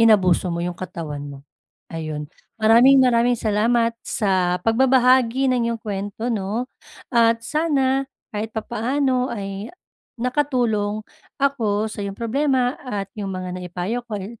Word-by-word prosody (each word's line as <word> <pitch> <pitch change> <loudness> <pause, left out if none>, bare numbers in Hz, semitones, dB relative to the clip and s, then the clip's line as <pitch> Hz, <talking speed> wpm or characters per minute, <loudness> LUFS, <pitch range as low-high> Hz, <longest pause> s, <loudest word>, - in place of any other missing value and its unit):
inabuso 195 -5 +4
mo 170 - -2
'yung 180 0 -3
katawan 160 -6 -6
mo. 140 - -9 0.5
Ayun, 155 -2 -4 0.3
maraming-maraming 240 +1 +5
salamat 230 +2 +2
sa 185 -4 +1
pagbabahagi 255 +1 +4
ng 235 -2 +1
iyong 235 - -1
kuwento 205 +3 -4
'no, 215 +4 -2 0.5
at 230 -1 +3
sana 275 -3 +1 0.2
kahit 215 +1 -3
papaano 255 +3 0
ay 200 0 -5 0.5
nakatulong 235 -5 0 0.3
ako 225 -7 +1
sa - - -6
iyong 200 -1 -4
problema 255 +2 0
at 205 -7 -5
'yung 205 -2 -5
mga 185 -1 -5
naipayo 180 +6 -3
ko, 210 - -3
eh, 205 +4 -8
225 Hz, 125 wpm, -22 LUFS, 195-250 Hz, 0.5 s, maraming-maraming